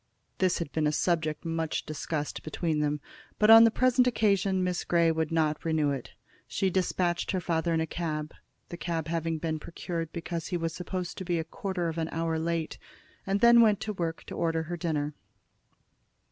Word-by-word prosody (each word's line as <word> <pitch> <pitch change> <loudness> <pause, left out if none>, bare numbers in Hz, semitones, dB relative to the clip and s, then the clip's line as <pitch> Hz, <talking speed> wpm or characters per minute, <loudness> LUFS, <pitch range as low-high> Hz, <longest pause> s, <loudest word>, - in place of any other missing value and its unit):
This 185 -2 +2
had 165 -4 -4
been 155 -1 +1
a - - +2
subject 155 -1 0
much 165 -1 -2
discussed 155 -1 -4
between 155 0 -2
them, 150 0 0 0.4
but 210 +1 +5
on 225 0 +11
the - - +6
present 255 +2 +3
occasion 200 -5 +2
Miss 180 -1 -1
Grey 170 -1 +3
would 160 -1 -1
not 155 -2 +1
renew 155 -3 +1
it. 135 -3 -6 0.3
She 190 -1 0
despatched 180 -1 0
her 190 - 0
father 170 -1 0
in 165 - +2
a 160 - +1
cab, 155 -2 -4 0.4
the 175 - -6
cab 165 -2 -3
having 165 -1 -1
been 155 0 -2
procured 165 0 -5
because 170 -1 -4
he 180 - -1
was 165 -1 -2
supposed 180 0 -5
to - - -4
be 175 -1 0
a 160 - -1
quarter 180 +1 -3
of 165 0 -3
an 160 0 -2
hour 165 0 -1
late, 165 -1 -2 0.5
and 195 +1 0
then 235 0 +8
went 215 -3 +4
to 215 - -3
work 165 -4 -3
to - - -9
order 165 -1 0
her 175 +2 -4
dinner. 150 -3 -2
165 Hz, 195 wpm, -29 LUFS, 160-180 Hz, 0.5 s, on